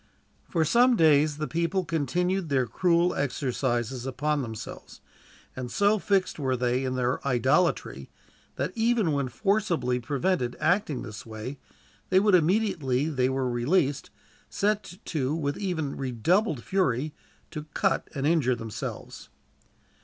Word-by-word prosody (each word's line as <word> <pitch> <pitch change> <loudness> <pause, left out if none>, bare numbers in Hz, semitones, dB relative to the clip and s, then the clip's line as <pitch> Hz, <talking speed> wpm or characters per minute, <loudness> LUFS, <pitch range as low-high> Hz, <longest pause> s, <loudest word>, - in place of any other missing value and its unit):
For 165 -3 +1
some 245 - +4
days 150 -4 +4
the 155 0 -3
people 170 +3 -1
continued 170 +3 -1
their 130 -3 +2
cruel 175 +6 +2
exercises 130 -2 -2
upon 145 +3 -1
themselves, 110 -4 -8 0.6
and 125 -1 -5
so 205 - +2
fixed 195 -4 0
were 130 -3 0
they 125 +1 0
in 130 -1 -2
their 125 0 0
idolatry 120 - +1 0.5
that, 140 +6 -2
even 225 -6 +2
when 140 -2 0
forcibly 170 - 0
prevented 135 +1 -1
acting 155 -4 +1
this 110 -4 -8
way, 115 +5 -7 0.5
they 185 - +5
would, 205 0 +3
immediately 165 - +2
they 130 -4 +1
were 130 -1 -1
released, 135 +4 0 0.4
set 205 -3 -1
to 145 -2 -1
with 145 -3 -1
even 165 -8 -2
redoubled 140 - 0
fury 150 -6 0 0.4
to 150 0 -6
cut - - +1
and 140 0 -2
injure 145 -6 +3
themselves. 115 -3 -7
145 Hz, 130 wpm, -27 LUFS, 130-180 Hz, 0.6 s, they